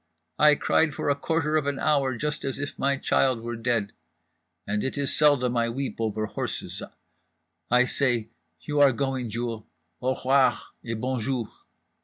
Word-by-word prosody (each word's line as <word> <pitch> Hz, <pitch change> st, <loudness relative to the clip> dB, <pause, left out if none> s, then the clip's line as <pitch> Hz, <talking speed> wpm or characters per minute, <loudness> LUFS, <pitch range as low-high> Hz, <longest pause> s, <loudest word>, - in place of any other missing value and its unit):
I 150 Hz, -1 st, +7 dB
cried 155 Hz, +1 st, +2 dB
for -, -, -2 dB
a -, -, +2 dB
quarter 155 Hz, +1 st, 0 dB
of 145 Hz, -2 st, -1 dB
an 140 Hz, -1 st, -1 dB
hour 140 Hz, -5 st, +1 dB
just 150 Hz, +3 st, -2 dB
as 135 Hz, -1 st, -2 dB
if 145 Hz, +1 st, -5 dB
my 140 Hz, 0 st, +1 dB
child 130 Hz, -3 st, +1 dB
were 120 Hz, +1 st, -4 dB
dead… 115 Hz, -3 st, -1 dB, 0.7 s
and 105 Hz, +1 st, -1 dB
it 135 Hz, -, -2 dB
is 140 Hz, -1 st, +1 dB
seldom 140 Hz, -5 st, +3 dB
I 115 Hz, 0 st, +1 dB
weep 135 Hz, +3 st, -4 dB
over 110 Hz, -1 st, -1 dB
horses—I 125 Hz, +3 st, -4 dB
say: 120 Hz, -4 st, 0 dB, 0.3 s
you 145 Hz, -, -2 dB
are 140 Hz, -2 st, +6 dB
going, 130 Hz, -2 st, -2 dB
Jewel, 115 Hz, -1 st, -4 dB, 0.3 s
_au 130 Hz, +1 st, 0 dB
r'oir 130 Hz, -1 st, +3 dB, 0.3 s
et 115 Hz, -2 st, -4 dB
bon 130 Hz, +1 st, -1 dB
jour. 115 Hz, -1 st, -2 dB
130 Hz, 165 wpm, -26 LUFS, 115-140 Hz, 0.7 s, I